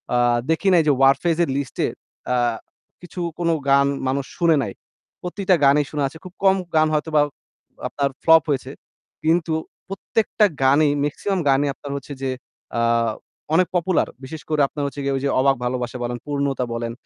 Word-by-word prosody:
আ - - +4 0.3
দেখি 175 +5 0
নাই 170 - +6
যে - - +6
Warfaze 140 +5 +3
এর 160 - -2
লিস্টে 140 -3 -2 0.5
আ - - +2 0.7
কিছু 180 +1 -9 0.2
কোন 170 -1 0 0.2
গান 140 0 +5 0.2
মানুষ 135 0 -1
শুনে 165 -2 +4
নাই। 100 - -5 0.5
প্রতিটা 185 +1 +1
গানই 145 +1 +4
শুনা 150 -2 -1
আছে। 160 - -11
খুব 185 - -10
কম 190 0 +5 0.2
গান 155 0 +5
হয়তোবা 155 0 +2 0.7
আপনার 140 -1 -1
ফ্লপ 160 0 +6
হয়েছে। 135 -1 -1 0.5
কিন্তু 165 0 +2 0.3
প্রত্যেকটা 210 +2 0 0.2
গানেই 145 +2 +4
মেক্সিমাম 190 +6 -2
গানই 140 +2 +3
আপনার 140 0 -9
হচ্ছে 140 +1 -8
যে 135 - -1 0.5
আ - - +1 0.7
অনেক 180 +1 +4
পপুলার। 180 0 +1 0.2
বিশেষ 150 +3 -7
করে 155 -1 +1
আপনার 145 - -5
হচ্ছে 140 0 -6
গিয়ে 140 0 0
ওই 135 - -2
যে - - +2
"অবাক 135 +1 +4
ভালোবাসা" 125 0 -2
বলেন, 120 0 -3
"পূর্ণতা" 140 -3 -1
বলেন। 115 0 -3
145 Hz, 170 wpm, -22 LUFS, 135-165 Hz, 0.7 s, নাই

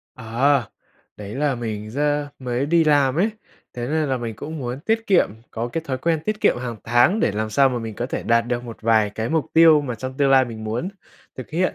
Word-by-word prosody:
À! 125 +1 +1 0.5
Đấy 105 0 -8
là 140 0 0
mình 110 -3 -5
ra 145 +2 0
mới 125 +1 -2
đi 165 +1 +3
làm 145 -2 +3
ấy, 205 +6 +2 0.4
thế 120 0 -4
nên 155 -1 0
là 130 - 0
mình 115 -2 -5
cũng 155 +2 -6
muốn 125 0 -4
tiết 225 +6 -1
kiệm 190 -3 +4 0.2
có 115 +1 -3
cái 165 +6 -3
thói 130 -1 -2
quen 165 0 0
tiết 215 +2 -2
kiệm - - +3
hàng 120 -2 -5
tháng 120 - +3
để - - +2
làm 110 +1 -2
sao 135 +4 +4
mà 125 - -2
mình 115 -2 -6
có 120 - -3
thể - - -4
đạt 115 0 +2
được 120 0 -2
một 115 -2 -10
vài 110 -2 +3
cái 110 +2 -4
mục 160 -2 0
tiêu 160 -2 +7
mà 130 -4 -4
trong 130 +3 -7
tương 140 -1 +2
lai 135 -1 +6
mình 110 -3 -8
muốn 115 +11 -2 0.5
thực 130 - -8
hiện. 180 +4 0
130 Hz, 240 wpm, -22 LUFS, 115-150 Hz, 0.5 s, tiêu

